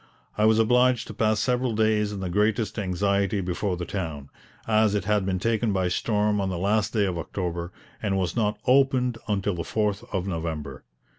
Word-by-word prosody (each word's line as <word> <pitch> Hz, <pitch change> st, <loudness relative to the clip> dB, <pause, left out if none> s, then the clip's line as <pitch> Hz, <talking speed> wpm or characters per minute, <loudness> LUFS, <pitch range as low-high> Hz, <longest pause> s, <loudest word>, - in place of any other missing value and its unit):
I 105 Hz, -, +2 dB
was 110 Hz, 0 st, +5 dB
obliged 125 Hz, +2 st, +3 dB
to -, -, -8 dB
pass 110 Hz, -1 st, +1 dB
several 125 Hz, -2 st, 0 dB
days 105 Hz, -1 st, +2 dB
in 100 Hz, -2 st, -5 dB
the 95 Hz, -, -3 dB
greatest 105 Hz, +2 st, +1 dB
anxiety 100 Hz, +1 st, 0 dB
before 90 Hz, +1 st, -2 dB
the 90 Hz, -, -4 dB
town, 80 Hz, -8 st, -5 dB, 0.4 s
as 110 Hz, -1 st, +3 dB
it 100 Hz, -3 st, -1 dB
had 105 Hz, -2 st, +1 dB
been 95 Hz, -1 st, 0 dB
taken 115 Hz, +2 st, 0 dB
by 95 Hz, -2 st, 0 dB
storm 105 Hz, +2 st, +1 dB
on 95 Hz, -, -1 dB
the 90 Hz, -, -3 dB
last 100 Hz, +3 st, +1 dB
day 105 Hz, -3 st, +2 dB
of 90 Hz, -3 st, -2 dB
October 85 Hz, 0 st, -4 dB, 0.3 s
and 100 Hz, -3 st, 0 dB
was 90 Hz, -3 st, -1 dB
not 105 Hz, -2 st, 0 dB
opened 125 Hz, -2 st, +3 dB
until 100 Hz, -1 st, 0 dB
the 85 Hz, -, -4 dB
4th 105 Hz, +2 st, -1 dB
of 95 Hz, -2 st, -1 dB
November. 80 Hz, -7 st, -4 dB
105 Hz, 195 wpm, -25 LUFS, 90-110 Hz, 0.4 s, was